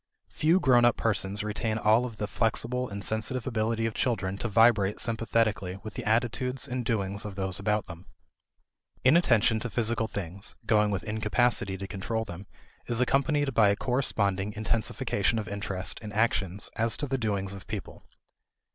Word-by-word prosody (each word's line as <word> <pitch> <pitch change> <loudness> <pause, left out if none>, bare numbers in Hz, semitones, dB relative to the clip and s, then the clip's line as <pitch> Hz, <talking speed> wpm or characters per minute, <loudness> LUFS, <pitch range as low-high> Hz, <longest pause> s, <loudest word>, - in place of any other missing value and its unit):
Few 165 +4 +2
grown 125 -7 +4
up 120 0 +4
persons 100 -2 -1
retain 110 +1 -2
all 110 +3 +3
of 115 -4 -7
the 105 - -2
flexible 120 +4 -1
and 100 0 -6
sensitive 110 +3 -2
ability 115 -2 -1
of 115 - -1
children 100 -8 -1
to - - -2
vibrate 105 -2 +3
sympathetically 110 -5 0
with 110 - -7
the - - -5
attitudes 120 +4 0
and 125 -1 -3
doings 100 -3 -1
of 105 -2 -7
those 95 -1 -2
about 105 +1 0
them. 85 0 -11 1.0
Inattention 120 -7 +4
to 120 - -4
physical 115 0 0
things 100 -1 -2
(going 105 -1 +3
with 100 -2 -2
incapacity 110 -2 0
to 100 - -6
control 110 +4 -3
them) 95 0 -9 0.4
is 120 -1 -1
accompanied 140 +2 +1
by 110 -3 +5
a 100 - +2
corresponding 105 -5 0
intensification 110 0 -1
of 110 - -3
interest 100 -3 -1
and 105 -2 -7
attention 100 -4 +1 0.2
as 115 -2 +2
to - - -2
the 135 -1 -2
doings 100 -4 -1
of 95 -2 -10
people. - - -7
110 Hz, 165 wpm, -28 LUFS, 100-120 Hz, 1.0 s, by